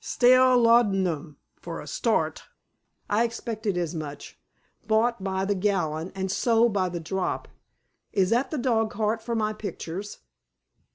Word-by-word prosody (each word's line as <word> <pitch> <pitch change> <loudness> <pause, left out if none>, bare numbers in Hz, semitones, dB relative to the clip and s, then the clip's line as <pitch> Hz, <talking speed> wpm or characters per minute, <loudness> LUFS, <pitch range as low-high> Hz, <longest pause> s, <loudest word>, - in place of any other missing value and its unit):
"Stale 255 +1 +5
laudanum, 195 - +2 0.2
for - - -6
a - - -8
start. - - -1 0.6
I 210 +3 +2
expected 225 -4 -3
as 175 -2 -2
much. 150 -3 -7 0.5
Bought 220 -1 +2
by 190 0 -1
the 205 - +1
gallon 180 -4 -1
and 190 -1 -2
sold 230 +1 +3
by 185 -2 +1
the 175 0 -4
drop. 185 +3 -3 0.6
Is 190 -1 +1
that 250 +3 +2
the 310 - -3
dogcart 225 -2 0
with 235 -1 0
my 215 -1 0
pictures?" 200 -1 -6
205 Hz, 135 wpm, -26 LUFS, 185-230 Hz, 0.6 s, Stale